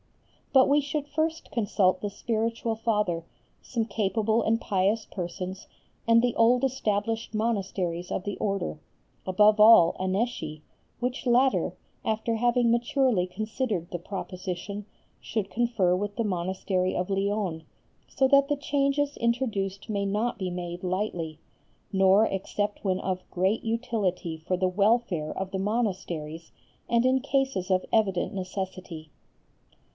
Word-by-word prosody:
But 265 -2 +6
we 290 +1 +4
should 290 +1 -3
first 315 +2 -2
consult 195 -5 +1
the 205 - -2
Spiritual 225 +2 -2
Father, 210 -7 0 0.4
some 230 -3 -2
capable 220 +1 +1
and 225 +1 +1
pious 205 +2 +1
persons, 185 +1 -6 0.4
and 230 0 +6
the 245 -1 +1
old 245 +3 +4
established 225 -3 -1
monasteries 190 -6 -1
of - - -2
the 205 0 -3
Order, 195 -6 -2 0.5
above 210 +3 +5
all 210 -6 +8
Annecy, 185 -6 -2 0.4
which 250 +2 -2
latter, 250 +2 +3 0.3
after 220 +1 0
having 240 +1 +3
maturely 240 -4 +2
considered 215 -2 -3
the 175 - -3
proposition, 190 +2 -5 0.4
should 210 -3 -3
confer 225 -7 +2
with 205 +2 -3
the 230 - 0
monastery 185 0 -1
of 180 +1 -1
Lyons, 195 -4 -1 0.5
so 265 - +2
that 280 +1 +5
the 290 - +1
changes 280 0 0
introduced 220 -5 -1
may 205 -3 -1
not 210 +5 -1
be 185 -2 -2
made 175 0 -5
lightly, 180 -4 -2 0.6
nor 195 +2 +5
except 205 +1 -2
when 190 -2 +1
of 185 -1 -3
great 190 +5 0
utility 220 -7 -1
for 160 +3 -2
the 185 0 +2
welfare 200 -4 +1
of 190 0 -4
the 190 - -2
monasteries 185 -7 -2 0.4
and 235 +1 +3
in 260 +1 +4
cases 270 -8 -1
of 185 -1 +2
evident 195 -2 +2
necessity. 185 -4 -6
205 Hz, 135 wpm, -27 LUFS, 185-235 Hz, 0.6 s, all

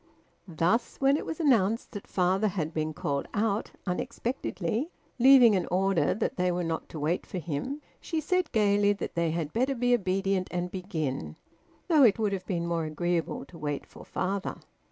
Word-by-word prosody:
Thus, 175 +7 0
when 275 +1 +4
it - - -3
was 320 - -4
announced 230 - +2
that 205 -3 -8
father 190 +3 +2
had 170 -5 -2
been 155 0 -1
called 140 -2 -2
out 210 0 0 0.2
unexpectedly, 235 - -2 0.3
leaving 250 -3 +8
an 185 - 0
order 190 0 +2
that - - -2
they 180 0 +2
were 175 0 -1
not 165 -1 -3
to 155 - -7
wait 160 +5 0
for - - -6
him, 180 - -4 0.2
she 325 - -2
said 365 +4 0
gaily 205 -2 +3
that 200 - -5
they 170 -1 +1
had 160 -2 -3
better 260 +4 +1
be 245 0 +2
obedient 195 -3 +1
and 180 0 -3
begin, 165 -8 -3 0.5
though 320 -5 +5
it 225 -7 +6
would 210 -3 0
have 185 -2 -4
been 170 -3 -1
more 170 -1 -1
agreeable 170 +2 -2
to 170 - -14
wait 145 -2 -3
for - - -13
father. 195 +1 -2
190 Hz, 180 wpm, -28 LUFS, 170-230 Hz, 0.5 s, leaving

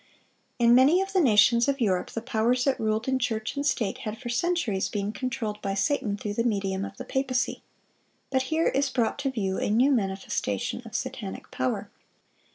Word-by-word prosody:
In 235 -1 +5
many 270 +8 +6
of 385 0 -2
the 375 - +4
nations 235 -1 +5
of 280 0 0
Europe 190 -6 +1
the 230 - -5
powers 235 +3 +1
that 275 -1 +1
ruled 220 +1 -1
in 265 0 +1
church 220 -2 -2
and 280 - -2
state 245 -8 0
had 215 0 -5
for 240 +1 -7
centuries 240 - 0
been 205 0 -2
controlled 220 -4 -4
by 195 0 -2
Satan, 205 0 0
through 205 0 -4
the 230 - 0
medium 195 -4 -1
of - - -7
the 255 - -7
papacy. 265 -1 -1 0.7
But 260 -1 +2
here 320 +1 +2
is 275 0 +1
brought 245 +1 0
to 280 -1 0
view 195 -7 -2
a - - -1
new 245 +7 +4
manifestation 195 - -1
of 225 0 -9
satanic 240 -7 -5
power. 130 0 -2
235 Hz, 190 wpm, -27 LUFS, 210-265 Hz, 0.7 s, many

